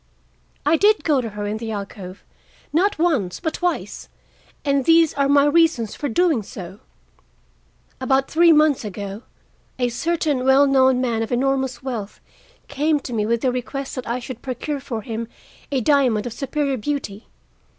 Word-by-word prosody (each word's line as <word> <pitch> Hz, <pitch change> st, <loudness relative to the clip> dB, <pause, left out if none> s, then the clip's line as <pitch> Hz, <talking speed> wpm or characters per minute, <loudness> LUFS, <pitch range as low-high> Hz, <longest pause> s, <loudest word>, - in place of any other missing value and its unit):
I 310 Hz, +3 st, +4 dB
did 420 Hz, +4 st, +3 dB
go 290 Hz, -5 st, +2 dB
to 230 Hz, -, -4 dB
her 205 Hz, 0 st, -5 dB
in 210 Hz, +1 st, -2 dB
the 225 Hz, 0 st, -6 dB
alcove, 200 Hz, -2 st, -7 dB, 0.5 s
not 390 Hz, +6 st, +2 dB
once, 285 Hz, -, 0 dB
but 320 Hz, -2 st, -2 dB
twice, 355 Hz, -1 st, -3 dB, 0.6 s
and 280 Hz, -2 st, +1 dB
these 330 Hz, -1 st, +5 dB
are 280 Hz, -1 st, +1 dB
my 285 Hz, 0 st, +5 dB
reasons 295 Hz, -8 st, +2 dB
for 290 Hz, -, -4 dB
doing 320 Hz, -1 st, +2 dB
so: 190 Hz, -1 st, -9 dB, 1.2 s
About 265 Hz, +1 st, +1 dB
three 335 Hz, +2 st, +5 dB
months 305 Hz, -4 st, +4 dB
ago 200 Hz, 0 st, -6 dB, 0.6 s
a 245 Hz, -1 st, +1 dB
certain 300 Hz, 0 st, -1 dB
well 265 Hz, +2 st, +5 dB
known 260 Hz, -2 st, +4 dB
man 235 Hz, -3 st, 0 dB
of 225 Hz, -, -3 dB
enormous 265 Hz, +1 st, 0 dB
wealth 230 Hz, -6 st, -5 dB, 0.5 s
came 295 Hz, +2 st, +1 dB
to 245 Hz, -, -7 dB
me 215 Hz, -2 st, 0 dB
with 235 Hz, 0 st, 0 dB
the 255 Hz, -, +1 dB
request 265 Hz, +2 st, -4 dB
that 255 Hz, -, -6 dB
I 235 Hz, +2 st, -1 dB
should 250 Hz, -1 st, -8 dB
procure 275 Hz, +3 st, -4 dB
for 235 Hz, -5 st, -5 dB
him 230 Hz, +1 st, -4 dB, 0.4 s
a 270 Hz, -2 st, +1 dB
diamond 250 Hz, -5 st, +2 dB
of 240 Hz, -, -4 dB
superior 275 Hz, 0 st, -2 dB
beauty. 230 Hz, -4 st, -4 dB
265 Hz, 165 wpm, -21 LUFS, 225-290 Hz, 1.2 s, these